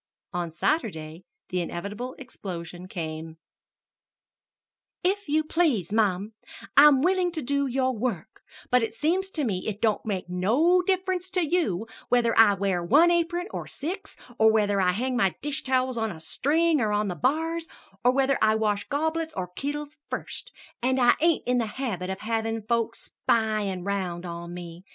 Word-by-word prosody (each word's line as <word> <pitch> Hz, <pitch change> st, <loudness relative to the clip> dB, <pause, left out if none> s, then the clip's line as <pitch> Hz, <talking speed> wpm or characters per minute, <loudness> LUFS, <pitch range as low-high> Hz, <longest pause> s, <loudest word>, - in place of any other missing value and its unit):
On 175 Hz, -1 st, -2 dB
Saturday 165 Hz, -, -2 dB, 0.2 s
the 180 Hz, 0 st, -1 dB
inevitable 205 Hz, +9 st, -5 dB
explosion 180 Hz, -8 st, -8 dB
came: 160 Hz, -2 st, -6 dB, 1.7 s
"If 395 Hz, 0 st, 0 dB
you 310 Hz, +2 st, +3 dB
please, 290 Hz, -, +1 dB
mum, 210 Hz, -1 st, +1 dB, 0.4 s
I'm 285 Hz, -1 st, +7 dB
willin' 365 Hz, 0 st, +2 dB
to 315 Hz, -, -3 dB
do 280 Hz, +2 st, 0 dB
your 260 Hz, 0 st, 0 dB
work, 220 Hz, -7 st, -4 dB, 0.3 s
but 245 Hz, -3 st, +2 dB
seems 365 Hz, +6 st, +1 dB
to 315 Hz, -5 st, -3 dB
me 195 Hz, -7 st, -2 dB
it 210 Hz, -2 st, -3 dB
don't 220 Hz, -2 st, +1 dB
make 195 Hz, -5 st, -3 dB
no 240 Hz, -, +3 dB
difference 375 Hz, 0 st, -1 dB
to 365 Hz, -2 st, +1 dB
you 290 Hz, -, 0 dB, 0.2 s
whether 240 Hz, -2 st, +3 dB
I 210 Hz, -3 st, +7 dB
wear 190 Hz, -3 st, 0 dB
one 300 Hz, -, +5 dB
apron 345 Hz, +1 st, +1 dB
or -, -, -5 dB
six, 365 Hz, +8 st, -5 dB, 0.2 s
or 220 Hz, 0 st, +6 dB
whether 205 Hz, -2 st, +2 dB
I 180 Hz, -1 st, +3 dB
hang 255 Hz, +6 st, -1 dB
my 195 Hz, -8 st, +2 dB
dish 295 Hz, +1 st, -2 dB
towels 255 Hz, -2 st, +1 dB
on 225 Hz, -1 st, -1 dB
a 165 Hz, -, -9 dB
string 310 Hz, -, +1 dB
or 215 Hz, -2 st, +1 dB
on 210 Hz, 0 st, +1 dB
the 180 Hz, -, -3 dB
bars, 325 Hz, -, 0 dB, 0.4 s
or 250 Hz, -, +6 dB
whether 270 Hz, +1 st, +2 dB
I 215 Hz, 0 st, +4 dB
wash 210 Hz, -2 st, 0 dB
goblets 320 Hz, +2 st, -1 dB
or 180 Hz, -2 st, -3 dB
kittles 290 Hz, +8 st, -5 dB
first; -, -, -6 dB, 0.3 s
and 260 Hz, +2 st, +1 dB
I 245 Hz, -1 st, +6 dB
ain't 335 Hz, -1 st, +3 dB
in 250 Hz, 0 st, +2 dB
the 230 Hz, -, 0 dB
habit 195 Hz, -9 st, -3 dB
of 190 Hz, 0 st, -4 dB
havin' 225 Hz, 0 st, -2 dB
folks 230 Hz, +1 st, -2 dB
spyin' 215 Hz, -5 st, 0 dB
round 185 Hz, -3 st, -2 dB
on 170 Hz, 0 st, -6 dB
me. 175 Hz, 0 st, -9 dB
230 Hz, 165 wpm, -26 LUFS, 190-300 Hz, 1.7 s, I'm